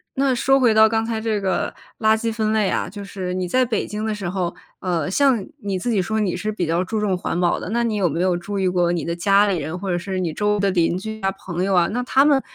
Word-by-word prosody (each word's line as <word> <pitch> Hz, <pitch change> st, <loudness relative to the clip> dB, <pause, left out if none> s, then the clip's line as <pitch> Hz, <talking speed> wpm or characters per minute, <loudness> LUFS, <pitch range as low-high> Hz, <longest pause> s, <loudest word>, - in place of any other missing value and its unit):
那 270 Hz, -1 st, +2 dB
说 270 Hz, +3 st, +3 dB
回 235 Hz, -4 st, +4 dB
到 220 Hz, 0 st, +6 dB
刚 225 Hz, 0 st, 0 dB
才 225 Hz, -1 st, -2 dB
这 220 Hz, -2 st, 0 dB
个 190 Hz, -1 st, -1 dB, 0.2 s
垃 220 Hz, 0 st, +4 dB
圾 225 Hz, 0 st, -2 dB
分 220 Hz, -1 st, 0 dB
类 215 Hz, -3 st, +2 dB
啊， -, -, -1 dB
就 200 Hz, +1 st, -8 dB
是 185 Hz, -2 st, -4 dB
你 185 Hz, -1 st, -2 dB
在 255 Hz, +8 st, +2 dB
北 230 Hz, -4 st, -1 dB
京 210 Hz, +1 st, -5 dB
的 220 Hz, -1 st, -1 dB
时 200 Hz, -3 st, -5 dB
候， 180 Hz, -2 st, -2 dB, 0.2 s
呃， 175 Hz, -3 st, -1 dB
像 260 Hz, -5 st, +3 dB, 0.2 s
你 200 Hz, -2 st, -2 dB
自 240 Hz, +7 st, -2 dB
己 205 Hz, -4 st, +2 dB
说 220 Hz, +4 st, -1 dB
你 195 Hz, -5 st, 0 dB
是 210 Hz, +4 st, -2 dB
比 195 Hz, -4 st, -2 dB
较 170 Hz, +3 st, +1 dB
注 220 Hz, +3 st, -2 dB
重 205 Hz, -3 st, +1 dB
环 175 Hz, -1 st, -3 dB
保 175 Hz, -1 st, +2 dB
的， -, -, -6 dB
那 235 Hz, +2 st, 0 dB
你 225 Hz, -2 st, 0 dB
有 180 Hz, -4 st, +2 dB
没 165 Hz, +4 st, -3 dB
有 185 Hz, -2 st, +2 dB
注 200 Hz, +4 st, -4 dB
意 190 Hz, -, +1 dB
过 175 Hz, -1 st, +2 dB
你 170 Hz, -4 st, -2 dB
的 170 Hz, -, -2 dB
家 200 Hz, +4 st, +4 dB
里 185 Hz, -4 st, 0 dB
人， 155 Hz, +4 st, -4 dB
或 195 Hz, 0 st, -3 dB
者 175 Hz, -, 0 dB
是 190 Hz, +1 st, -4 dB
你 170 Hz, -4 st, -2 dB
周 210 Hz, +2 st, +1 dB
围 -, -, -2 dB
的 195 Hz, -1 st, +2 dB
邻 175 Hz, 0 st, +1 dB
居 220 Hz, +2 st, -6 dB
啊、 195 Hz, 0 st, +1 dB
朋 180 Hz, -2 st, -4 dB
友 195 Hz, 0 st, +1 dB
啊， 175 Hz, -1 st, +4 dB
那 245 Hz, +3 st, -1 dB
他 265 Hz, +2 st, +3 dB
们 285 Hz, -2 st, +4 dB
200 Hz, 315 characters per minute, -21 LUFS, 180-220 Hz, 0.2 s, 到